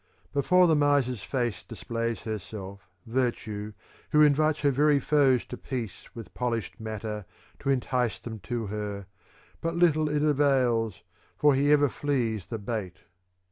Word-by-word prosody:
VI - - -36
Before 180 +6 +5
the 160 -2 +4
miser's 140 -6 +2
face 120 -1 -2
displays 115 -2 -4
herself 100 -3 -7 0.2
virtue, 115 -4 -2 0.4
who 150 0 +5
invites 150 +1 +3
her 145 -1 +3
very 145 +2 +3
foes 135 -3 +3
to 125 - -7
peace 120 -7 -5
with 105 -6 -9
polished 115 -4 -3
matter 110 -2 -5 0.3
to - - -3
entice 125 -3 0
them 110 -2 -8
to 115 +3 -3
her; 100 -1 -4 0.6
but 165 0 -2
little 155 -3 +3
it 150 0 0
avails, 130 - +2 0.3
for 150 -1 +5
he 140 +2 +3
ever 145 -1 +5
flees 120 - -1
the 115 - -4
bait. 105 -4 -5
120 Hz, 145 wpm, -27 LUFS, 110-145 Hz, 0.6 s, Before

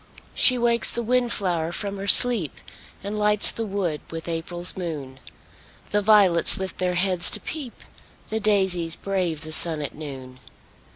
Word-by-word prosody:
She 255 - +5
wakes 235 -1 +4
the 235 - -3
wind 245 +1 -1
flower 170 -5 -2
from 200 +3 -5
her 195 +1 -7
sleep, 215 - +5 0.5
And 205 +1 -6
lights 210 0 +5
the 225 -1 -6
woods 185 -6 -4
with 165 0 -9
April's 175 +1 -4
moon; 150 -7 -8 0.7
The 210 - 0
violets 200 -5 +2
lift 190 -2 -7
their 180 -1 -2
heads 180 -1 +2
to - - -4
peep, 285 -7 -9 0.5
The 220 - -3
daisies 190 -6 0
brave 180 -6 -4
the 155 0 -9
sun 160 0 +2
at 145 - -6
noon. 135 -4 -11
185 Hz, 160 wpm, -22 LUFS, 165-210 Hz, 0.7 s, She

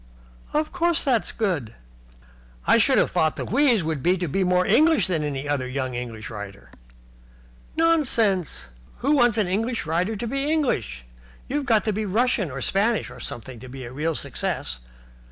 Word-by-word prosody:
"Of 305 +1 0
course 345 -3 +1
it's 245 -6 +2
good." 175 - -2 0.9
"I - - +5
should - - +4
have - - +3
thought 155 -1 +1
the - - -4
wheeze 245 - +3
would 155 -3 -2
be 180 +5 +2
to 175 -1 -2
be 190 +6 0
more 180 0 +2
English 315 0 +4
than 175 -5 0
any 145 -1 -3
other 140 -3 -1
young 130 0 -3
English 120 -3 -5
writer." 100 -2 -9 1.0
"Nonsense! 245 - +1 0.4
Who 275 - +1
wants 240 -6 +4
an 215 - +3
English 225 +5 -1
writer 175 +7 0
to 215 - -4
be 275 +5 -1
English? 240 - -1 0.4
You've 285 0 -2
got 220 -5 +4
to 215 - 0
be 215 +1 -2
Russian 220 -2 +1
or 135 0 -6
Spanish 210 - 0
or - - -11
something 120 +1 -6
to 130 - -11
be 130 +1 -8
a 120 - -8
real 155 +4 -1
success. - - -3
190 Hz, 175 wpm, -24 LUFS, -, 1.0 s, I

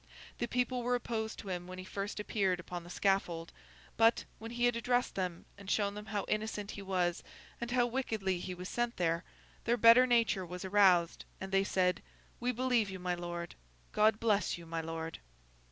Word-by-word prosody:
The 240 - 0
people 250 +1 0
were 245 +1 +1
opposed 225 -2 -3
to 200 - -8
him 180 -1 -3
when 185 0 -8
he 185 - -6
first 200 +2 -4
appeared 195 -4 0
upon 175 0 -6
the 175 - -12
scaffold; 175 -3 0 0.4
but, 225 +1 +4
when 225 - -7
he 240 +1 0
had 245 -1 +3
addressed 245 +1 +1
them 180 -3 -3
and 200 -1 -9
shown 200 -1 +1
them 210 +1 -8
how 205 0 -2
innocent 215 -1 -2
he 205 - -7
was 180 -3 0 0.4
and 235 - -3
how 245 0 +3
wickedly 220 -7 -1
he 180 +1 -5
was 180 +1 -6
sent 240 +2 -1
there, 170 0 +1 0.4
their 235 +1 +2
better 235 +3 +8
nature 230 -6 +3
was 180 +1 -6
aroused, 185 -4 +4
and 190 0 -6
they 195 0 +4
said, 180 -2 +1 0.4
'We 245 +1 +1
believe 245 -3 +2
you, 190 - -5
my 180 0 -1
Lord. 175 -1 -5 0.4
God 215 0 +4
bless 210 -5 +1
you, 170 - -11
my 165 0 -3
Lord! 165 0 -5
200 Hz, 195 wpm, -33 LUFS, 180-230 Hz, 0.4 s, better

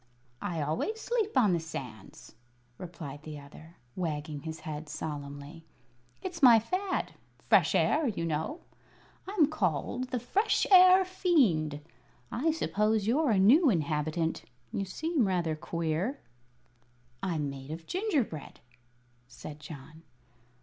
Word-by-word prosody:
"I 165 -4 -2
always 165 - -2
sleep 445 - -1
on 215 -7 +5
the 170 - +1
sands," 130 -10 -9 0.5
replied 160 -5 -8
the 155 -1 -8
other, 155 +4 -14 0.2
wagging 150 -4 -3
his 160 +1 -7
head 155 -2 -6
solemnly. 145 +1 -6 0.6
"It's 355 -3 -5
my 245 -4 +9
fad. 370 - -1 0.3
Fresh - - +3
air, 305 -1 +3
you 195 -7 -2
know. 160 - -2 0.7
I'm 385 -5 +4
called 210 - -1
the 250 - -1
'Fresh 400 - +1
Air 370 0 +8
Fiend.' 230 - +2 0.5
I 265 +8 0
suppose 215 -9 +1
you're 275 +6 +2
a 215 - +3
new 265 - +6
inhabitant. 160 -2 -1 0.3
You 195 - -1
seem 300 - 0
rather 175 -4 0
queer." 170 - -2 1.0
"I'm 155 -6 -1
made 135 0 -9
of 160 +1 -7
gingerbread," 300 - -2 0.7
said 150 +4 -10
John. 150 +1 -11
175 Hz, 120 wpm, -30 LUFS, -, 1.0 s, my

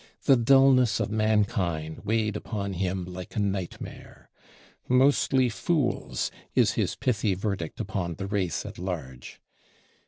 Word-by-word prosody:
The 135 - +6
dullness 130 0 +5
of - - -1
mankind 100 -7 0
weighed 110 0 0
upon 100 -2 -4
him 90 0 -2
like 90 0 -8
a - - 0
nightmare. 95 -3 -5 0.6
"Mostly 130 0 +4
fools" 135 +3 -1 0.2
is - - +4
his - - -1
pithy 110 -5 0
verdict 95 -4 -4
upon 85 -3 -3
the 95 - -5
race 95 -6 -1
at - - -8
large. 80 -9 -6
100 Hz, 125 wpm, -27 LUFS, 90-115 Hz, 0.6 s, The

